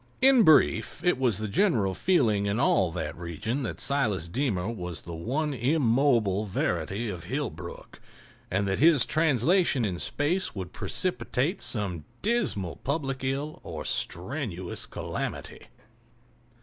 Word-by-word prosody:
In 265 -2 +6
brief, 155 -8 +4
it 180 -7 +2
was 120 -6 +2
the 110 0 -3
general 105 - +2
feeling 110 - +2
in 100 +3 0
all 95 -9 +3
that 80 -3 -4
region 100 - -3
that 125 - -4
Silas 110 - 0
Deemer 100 -3 -1
was 90 -7 -5
the 85 - -7
one 140 - -2
immobile 120 -6 +2
verity 95 +4 -1
of 90 -6 -6
Hillbrook, - - -5 0.5
and 100 +2 0
that 95 0 0
his 155 -5 +5
translation 155 - +2
in 90 -4 -2
space 145 - -1
would 95 -2 -6
precipitate 150 - -1
some 95 - -2 0.2
dismal 200 - 0
public 135 -2 -3
ill 140 +4 -2
or - - -7
strenuous 95 - -3
calamity. - - -5
120 Hz, 130 wpm, -27 LUFS, 95-145 Hz, 0.5 s, In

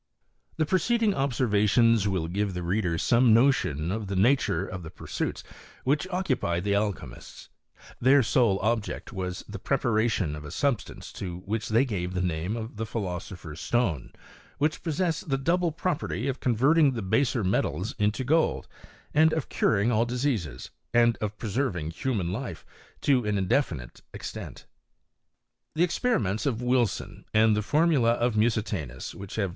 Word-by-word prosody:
* - - -39
The 155 - +2
preceding 210 +6 +2
obseiTations 115 - +2
will 95 -5 -1
give 100 +2 -2
the 90 - -3
reader 90 -1 0
some 120 +3 +4
notion 90 - +2
of 110 0 -3
the 100 - -3
nature 110 +1 +2
of 90 - -6
the 80 - -8
pursuits - - -4 0.4
which 145 +7 +1
occupied 135 - -1
the 100 0 +1
alchymists: 100 -1 -4 0.5
their 135 +2 +5
sole 115 -3 +3
object 115 0 -2
was 90 -2 -4
the - - -7
preparation 110 -8 0
of 75 - -8
la 75 - -8
substance 140 - -2
to 90 -2 -6
which 110 +2 -2
they 115 +5 +4
gave 90 -6 -3
the 90 - 0
name 90 +5 -2
of 110 -1 -7
the 115 - -2
philoso 95 -4 -4
pher's 75 -2 -9
stone, 100 - 0 0.5
which 150 +2 0
possessed 165 -1 -1
the 135 - +2
double 170 +5 +1
property 160 -6 -2
oj 135 -1 -2
converting 135 +5 +3
the 115 -4 -4
baser 120 +3 +1
metals 95 0 0
into 105 +5 +1
gold, 160 +5 +1 0.5
and 160 +2 +5
of 160 -4 -2
curing 105 +1 +2
al^ 115 0 +2
diseases, 120 - -2 0.2
and 120 -1 +5
of 105 0 -4
preserving 105 - -2
human 95 -2 -2
life 100 - -5 0.4
to 130 -4 +3
an 105 -1 0
indefinite 90 - -1
extent. - - -7 1.1
The 165 - +3
experiments 115 - 0
of 120 -5 0
Wilson, 125 -3 -1
and 110 0 +5
the 105 - +1
formulj 145 -2 +3
of 120 0 0
Musitanus, 105 - -1
which 100 -1 -8
have 100 -3 0
110 Hz, 155 wpm, -27 LUFS, 95-135 Hz, 1.1 s, their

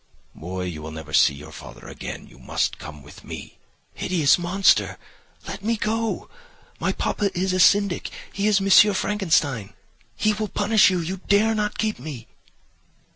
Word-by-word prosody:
"'Boy, 90 +3 -6
you 85 -4 -5
will 75 - -7
never 80 -1 -9
see 70 - +5
your 75 +2 -11
father - - -11
again; - - -7
you - - -18
must - - -2
come 75 -2 -10
with - - -14
me.' - - -9 0.3
"'Hideous 165 -4 +2
monster! 185 +3 +2 0.5
Let 195 0 -7
me 230 +1 0
go. 225 +2 -2 0.5
My - - 0
papa 205 - -1
is 185 +1 0
a 185 - 0
syndic—he 200 +2 +1
is 205 -2 +4
M. 195 +1 +6
Frankenstein—he 160 - -1
will 215 +1 -3
punish 210 +2 +4
you. 180 -2 0
You 180 +4 -4
dare 215 +2 +3
not 210 -1 -2
keep 215 -1 -1
me. 130 -4 -8
190 Hz, 155 wpm, -23 LUFS, -, 0.5 s, M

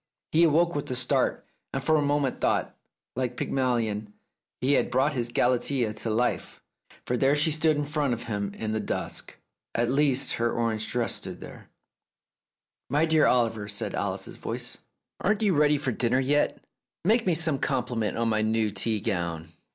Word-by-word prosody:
He 165 +2 +4
awoke 170 +2 +3
with 145 - -3
a 125 - -1
start, 125 +1 +1 0.3
and 135 - -3
for 155 +2 +3
a 150 - +3
moment 145 -2 0
thought - - +1
that, - - -31 0.4
like 125 -1 -2
Pygmalion, 115 -5 -1 0.5
he 135 +3 +2
had - - +2
brought 135 +4 +2
his 120 -3 -1
Galatea 125 -1 +1
to 110 +2 -4
life, 120 +3 -1 0.5
for 125 - 0
there 135 +3 +3
she 150 +2 +2
stood 155 0 +2
in 145 - -1
front 145 -4 0
of 115 - -8
him 100 -3 -3
in 110 -1 -3
the 110 - -1
dusk. - - -4 0.4
At 120 +1 +1
least, 135 -1 +3
her 120 0 +2
orange 115 -2 -1
dress 120 -1 0
stood - - -6
there. - - -11 1.2
"My 150 +3 +3
dear 160 -1 +4
Oliver," 115 -4 +1
said 105 0 -3
Alice's - - -3
voice, - - -5 0.4
"aren't 210 +3 +1
you 200 -3 +3
ready 150 -1 +4
for 135 -2 -1
dinner 120 +2 +1
yet? 145 +3 +1 0.4
Make 220 +2 +3
me 175 - +3
some 155 -3 +2
compliment 120 -5 -1
on 115 0 +1
my 110 -1 +1
new 110 -1 +1
tea 110 +1 0
gown. 85 -6 -2
125 Hz, 180 wpm, -27 LUFS, 115-145 Hz, 1.2 s, He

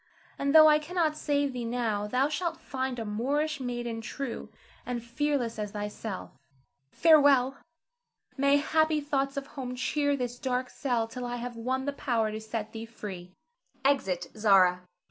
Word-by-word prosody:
And 280 +2 +1
though 310 0 +10
I 300 0 +6
cannot 320 0 0
save 285 -2 0
thee 245 -1 -4
now, 230 -3 -1
thou 255 +5 +2
shalt 335 +3 -2
find 260 -1 -3
a 225 - -4
Moorish 285 +8 -1
maiden 240 -2 -3
true 260 +2 -5 0.3
and 245 -2 -4
fearless 245 -2 -1
as 210 -1 -4
thyself. 210 -1 -5 0.6
Farewell! 285 -5 +5 0.8
May 280 +1 +4
happy 315 +1 +2
thoughts 275 -1 -1
of 275 - -2
home 255 -3 -6
cheer 285 +3 0
this 245 -1 -4
dark 255 -2 -1
cell 240 -5 -1
till 245 +1 -6
I 240 - -3
have 245 0 -5
won 260 +3 -2
the 285 - -1
power 230 -6 0
to 215 +1 -5
set 220 -1 -4
thee 225 0 -7
free. 185 -5 -8 0.5
[Exit 195 -11 +1
Zara. 190 -4 +5
250 Hz, 160 wpm, -29 LUFS, 225-285 Hz, 0.8 s, though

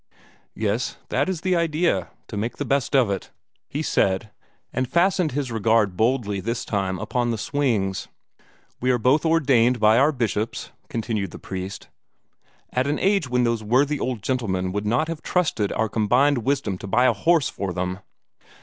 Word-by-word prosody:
"Yes, 110 +2 -1
that 140 +7 +1
is 180 -4 -3
the 185 0 +1
idea 160 - +1 0.2
to - - -7
make 110 +4 -3
the 145 - -3
best 140 -1 0
of 125 -7 +4
it," 100 - -4 0.4
he 150 +3 -3
said, 100 -4 +1 0.4
and 130 -1 -1
fastened 175 -3 +2
his 135 -3 -2
regard 110 -3 +2
boldly 110 -2 +1
this 115 +5 -3
time 95 -3 -1
upon 120 +6 -1
the 115 - -1
swings. 110 -7 -1 0.7
"We 130 +1 +2
were 125 - +2
both 130 +7 +2
ordained 130 -7 +3
by 110 +2 +5
our 145 +3 +4
bishops," 115 -4 -2 0.2
continued 110 -4 -2
the - - -10
priest, 95 +1 -6 0.8
"at 130 +2 0
an 145 - 0
age 195 -8 +1
when 125 0 +2
those 115 -2 +1
worthy 135 +7 +2
old 125 -5 -3
gentlemen 95 -8 -1
would 105 +2 -2
not 120 +9 +1
have 165 -2 -5
trusted 150 - 0
our 110 - 0
combined 120 +6 +2
wisdom 110 -6 -1
to - - -7
buy 120 +6 +3
a - - +5
horse 165 -5 +2
for 100 -2 -4
them." 90 +1 -3
120 Hz, 175 wpm, -23 LUFS, 105-145 Hz, 0.8 s, by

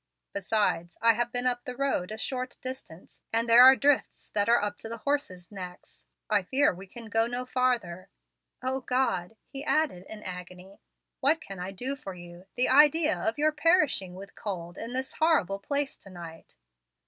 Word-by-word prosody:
Besides, 190 -4 0
I 230 0 +5
have 240 +2 -1
been 245 +1 0
up 245 -1 0
the 250 - -6
road 270 -9 -1
a 215 - -5
short 255 +2 -3
distance, 255 -10 -9
and 230 +1 +1
there 235 +1 +8
are 260 +1 +10
drifts 285 0 0
that 205 +1 0
are 235 - +6
up 205 0 -3
to 225 - -7
the 230 - -5
horses' 215 -10 -3
necks. 180 - -10 0.2
I 210 -1 +3
fear 265 +6 +2
we 190 +2 -11
can 230 +4 -10
go 225 +1 +1
no 245 +1 -3
farther. 245 -9 -1 0.5
O 260 +1 -1
God!" 250 -7 -1
he 275 0 -6
added 295 - 0
in 215 -1 -8
agony, 180 +1 -9 0.4
"what 295 +5 +3
can 195 -9 -9
I 180 +1 -4
do 250 +8 -3
for 195 -9 -8
you? 175 +1 -12
The 250 - +3
idea 300 +3 +5
of 225 - -2
your 305 +1 +3
perishing 300 - +2
with 195 +1 -10
cold 175 -4 -6
in 230 +4 -6
this 260 +1 -2
horrible 295 - +2
place 280 +6 -2
to 195 - -14
night!" 170 -3 -11
230 Hz, 185 wpm, -28 LUFS, 185-265 Hz, 0.5 s, are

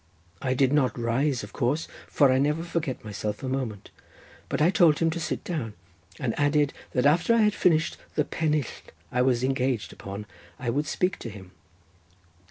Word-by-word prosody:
I 130 -1 0
did 135 +1 +3
not 130 -5 +2
rise, 120 +3 0
of 105 - -9
course, 145 +5 0 0.2
for 140 -3 +4
I 130 - +3
never 150 +4 +1
forget 165 -8 -3
myself 105 +3 -4
a - - -2
moment, 130 -6 -3 0.6
but - - -1
I 160 +4 +4
told 170 -7 +5
him 165 -1 +2
to 170 - -3
sit 160 - -3
down, 135 -12 -4 0.4
and 120 -4 -1
added 145 0 +3 0.2
that 125 +1 +1
after 170 +10 +4
I 230 - +4
had 210 -1 +4
finished 165 -5 +2 0.2
the 150 - +2
pennill 155 -1 0 0.5
I 125 - +1
was 125 -1 +2
engaged 130 -3 0
upon, 100 +2 -7 0.3
I 120 -2 -2
would 145 +4 -1
speak 180 +4 0
to 115 - -6
him. 95 -3 -11
135 Hz, 180 wpm, -27 LUFS, 120-155 Hz, 0.6 s, told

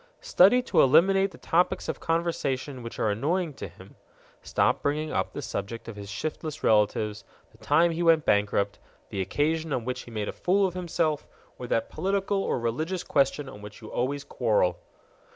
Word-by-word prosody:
Study 240 +8 +5
to - - +3
eliminate 195 +8 +5
the - - -14
topics 175 +2 +1
of - - -3
conversation 145 -5 -2
which 115 0 -8
are 105 - +1
annoying 155 - -1
to 115 - -7
him: 95 +2 -16 0.4
stop - - +1
bringing 150 +2 -1
up - - -1
the - - -6
subject 105 +4 -5
of 115 - -7
his 100 -1 -8
shiftless 155 +5 -5
relatives, 105 -1 +2 0.3
the - - -23
time 170 +1 +3
he 165 +1 -3
went 165 -3 +4
bankrupt, 100 0 +1 0.3
the 100 - -3
occasion 155 - -1
on 125 -4 -1
which 125 0 -3
he - - -12
made 105 -3 -3
a - - -2
fool 195 +2 +2
of 185 - -2
himself, 170 -4 -1 0.3
or 125 - -6
that 115 - 0
political 195 +1 0
or - - -1
religious 155 +11 -2
question 140 0 +1
on 105 -6 -10
which 105 0 -10
you 110 - -11
always 140 +3 -1
quarrel. 105 -7 +1
145 Hz, 185 wpm, -27 LUFS, 110-170 Hz, 0.4 s, Study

